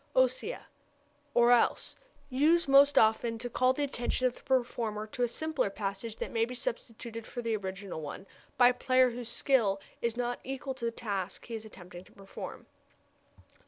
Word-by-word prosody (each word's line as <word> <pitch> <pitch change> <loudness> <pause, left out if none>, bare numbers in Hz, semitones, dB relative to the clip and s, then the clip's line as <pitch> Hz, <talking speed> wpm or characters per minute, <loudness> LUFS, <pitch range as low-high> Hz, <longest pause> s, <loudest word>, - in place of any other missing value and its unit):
Ossia - - +1 0.7
or 240 0 +6
else; 245 - +3 0.3
used 310 +5 +3
most 280 +1 +6
often 225 +1 +4
to 245 +1 -6
call 255 +2 +3
the 290 +3 -1
attention 255 -2 -1
of 250 - +2
the - - -15
performer 235 -5 -1
to 220 +3 -7
a 245 - +4
simpler 300 -2 -1
passage 200 +2 -4
that - - -5
may 225 -1 +1
be 250 +2 -3
substituted 230 - -5
for 245 - -6
the 230 -1 0
original 195 -3 -5
one 150 +5 -7 0.3
by 245 -1 +7
a - - +1
player 255 0 +3
whose 240 0 -6
skill 230 -7 +2 0.2
is 235 0 -1
not 245 0 -1
equal 270 0 -4
to 255 -2 -6
the - - +2
task 200 -5 -4
he 235 - -8
is 220 -1 -5
attempting 180 -4 -11
to - - -20
perform. 195 -1 -9
240 Hz, 180 wpm, -31 LUFS, 215-255 Hz, 0.7 s, by